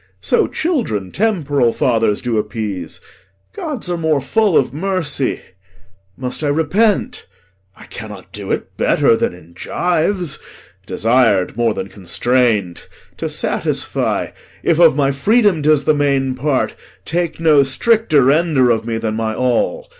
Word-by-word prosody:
So - - +1
children 235 - -2
temporal 145 - +1
fathers 115 -3 +1
do 120 -3 0
appease; 105 -4 -5 0.5
Gods 285 - -5
are 175 -1 -2
more 160 -3 +1
full 200 - +2
of 135 - +1
mercy. 160 -5 -1 0.8
Must 130 +4 -4
I - - +1
repent, 200 - 0 0.5
I - - -13
cannot - - -10
do - - -8
it - - -3
better - - +3
than 90 - -1
in 85 -1 -17
gyves, 175 - -1 0.5
Desir'd 115 -6 +2
more 115 -2 +1
than - - -4
constrain'd. 105 -1 0 0.3
To - - -3
satisfy, - - -2 0.3
If 165 -1 +2
of 165 -4 +6
my 140 -1 +2
freedom 200 - +2
'tis 150 -1 +3
the 155 - +3
main 140 -2 +1
part, 135 +1 -1 0.3
take 170 0 -2
No 155 -3 +5
stricter 155 - +2
render 140 -2 +3
of 110 0 -1
me 115 -1 -1
than 110 -1 -2
my 110 0 -2
all. 310 - -1
140 Hz, 140 wpm, -17 LUFS, 115-175 Hz, 0.8 s, of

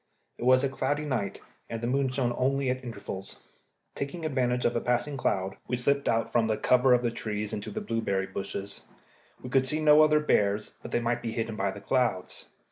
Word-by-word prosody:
It - - -3
was 130 +1 +5
a - - +3
cloudy 145 +2 -1
night, 120 -9 -2 0.3
and 115 - -3
the 120 - -4
moon 135 +2 +1
shone 125 -2 0
only 135 0 +1
at 130 0 -4
intervals. 100 -5 -7 0.5
Taking 150 +4 -4
advantage 125 -4 0
of 120 - +2
a 120 - +1
passing 125 +4 0
cloud, 95 -7 -1
we 125 - 0
slipped 140 +3 +1
out 115 0 +1
from 115 -2 +2
the 110 -1 0
cover 125 0 +4
of 120 - 0
the 120 - +1
trees 105 -2 -4
into 105 - -4
the 215 - -4
berry 110 - -1
bushes. 100 +1 -4 0.6
We 125 - -7
could 130 0 +3
see 150 +3 0
no 150 0 +7
other 150 0 +5
bears, 105 -7 +1
but - - -8
they 120 - 0
might 120 +1 0
be 115 -1 -3
hidden 115 -1 -2
by 100 -1 0
the 100 +1 -7
clouds. 115 -5 -1
120 Hz, 210 wpm, -28 LUFS, 110-135 Hz, 0.6 s, no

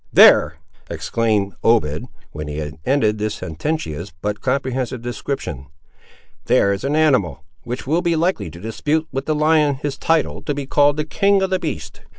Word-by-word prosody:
There," 75 +2 +7 0.3
exclaimed 105 -4 0
Obed, 90 -11 +2 0.2
when 75 0 -6
he 75 0 -5
had 75 0 -5
ended 110 -6 +2
this 105 0 -2
sententious 85 - -4
but 105 +3 -3
comprehensive 130 -2 -2
description, 120 - -4 0.8
"there 100 - +3
is 100 - -5
an 140 +2 0
animal, 130 - +2 0.2
which 125 +2 -5
will 160 +6 +1
be 170 -1 +1
likely 170 - 0
to 85 - -11
dispute 150 - -1
with 135 +1 -4
the 155 - +1
lion 150 -1 +3
his 140 +1 -4
title 165 -1 +1
to 145 - -3
be 140 -1 -4
called 145 +1 +3
the 150 - -1
king 195 +4 +2
of 190 - -1
the 185 - +1
beasts!" 80 - -5
130 Hz, 170 wpm, -20 LUFS, 100-155 Hz, 0.8 s, There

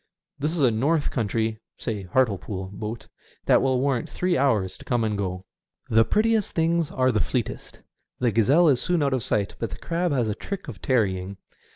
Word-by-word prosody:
This 150 +3 -1
is 170 - -1
a 125 -4 +5
north 145 +7 +1
country 110 -1 -1
— - - -66
say 110 -4 -3
Hartlepool 95 -2 -1
— - - -11
boat, 110 +2 -5 0.4
that - - +5
will 130 -1 +2
want 130 -3 0
three 180 -1 0
hours 115 - +1
to - - -11
come 120 -2 +1
and 110 -1 0
go. 95 -2 -3 0.5
The 115 0 +6
prettiest 220 - +1
things 165 -1 +1
are 130 0 +2
the 110 - +1
fleetest. - - -3 0.4
The 125 -2 +1
gazelle 135 - +4
is 130 -4 +3
soon 175 -4 +1
out 140 -1 +1
of 130 -3 -1
sight, 105 -1 0
but 115 - -2
the - - -8
crab 175 0 -1
has 125 -5 +1
a 105 - 0
trick 195 - -6
of 120 -9 -8
tarrying. 100 -6 0
120 Hz, 205 wpm, -25 LUFS, 105-145 Hz, 0.5 s, The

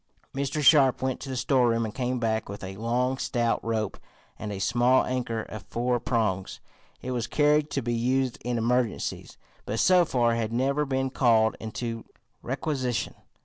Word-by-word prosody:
Mr. 140 +2 -2
Sharp 135 -3 +5
went 130 -1 -1
to 135 - -8
the 130 - -3
storeroom 120 -2 +2
and 105 - -5
came 125 0 -1
back 110 -3 -1
with 100 0 -7
a 95 0 -6
long, 125 +4 0
stout 120 -2 0
rope 110 -3 -2 0.4
and 105 - -5
a 100 - -4
small 120 +5 +3
anchor 120 -3 -2
of 110 - -8
four 120 +1 0
prongs. 105 -6 -1 0.4
It 130 - -3
was 120 -2 -2
carried 150 0 +2
to 135 - -2
be 120 +1 -1
used 125 +2 0
in 120 0 -1
emergencies, 120 0 -1 0.3
but 110 - -3
so 180 -1 +5
far 120 -7 +1
had 115 -1 -2
never 135 +5 +1
been 135 -1 -1
called 115 -4 +3
into 115 +1 -5 0.4
requisition. 130 -2 -2
120 Hz, 170 wpm, -27 LUFS, 115-130 Hz, 0.4 s, Sharp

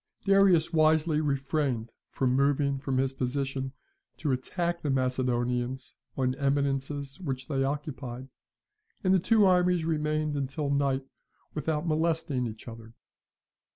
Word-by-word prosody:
Darius 195 -5 +4
wisely 155 0 +3
refrained 140 -5 -1 0.2
from 130 -1 0
moving 140 0 +2
from 135 -1 -2
his 135 0 +1
position 135 0 -2 0.5
to 150 - -1
attack 170 +7 -2
the 150 - -2
Macedonians 125 -1 -1 0.2
on 130 -1 +1
eminences 140 0 -1
which 135 -7 -4
they 135 -2 0
occupied, 135 -3 -4 0.8
and 185 -1 +4
the 190 - +5
two 215 +3 +4
armies 180 -2 +3
remained 155 -1 0
until 140 +1 -2
night 140 -1 +1 0.5
without 150 +1 -1
molesting 155 -5 0
each 110 +1 -9
other. 115 0 -10
140 Hz, 120 wpm, -28 LUFS, 130-155 Hz, 0.8 s, the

